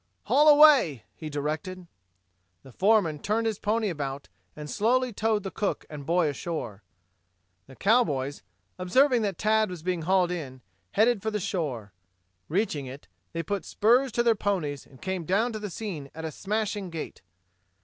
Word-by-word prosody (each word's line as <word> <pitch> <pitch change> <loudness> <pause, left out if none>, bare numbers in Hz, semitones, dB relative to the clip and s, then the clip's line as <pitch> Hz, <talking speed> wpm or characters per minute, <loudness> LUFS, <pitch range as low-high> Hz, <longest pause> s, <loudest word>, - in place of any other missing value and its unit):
"Haul 290 +7 +5
away," 290 - +6
he 155 - -7
directed. 155 +5 -4 0.8
The 135 - -14
foreman 185 - +2
turned 220 +7 -1
his 220 -3 -1
pony 220 +1 0
about 140 -5 -4 0.3
and 150 0 -7
slowly 245 - +1
towed 205 -2 -1
cook 205 - -2
and 145 -2 -8
boy 170 -1 +3
ashore. 140 - -4 0.9
The 135 - -14
cowboys, 145 - +1 0.4
observing 250 +7 +3
that 200 -4 -2
Tad 215 -1 +2
was 175 -3 -8
being 180 -1 -1
hauled 180 +1 +2
in, 135 -7 -6 0.3
headed 220 0 +3
for 220 - -1
the 210 -1 -2
shore. 130 - -3 0.6
Reaching 160 -6 -1
it, 135 +3 -10 0.3
they 165 0 -2
put 200 +4 -3
spurs 245 +5 +2
to 240 - +2
their 235 -1 +4
ponies 180 - -2
and 130 - -18
came 190 -2 -3
down 215 +8 +1
to 215 - -4
the 210 -1 -5
scene 170 -7 -6
at 160 0 -6
a 160 - -4
smashing 205 +2 -3
gait. 165 -2 -7
185 Hz, 160 wpm, -27 LUFS, 150-220 Hz, 0.9 s, away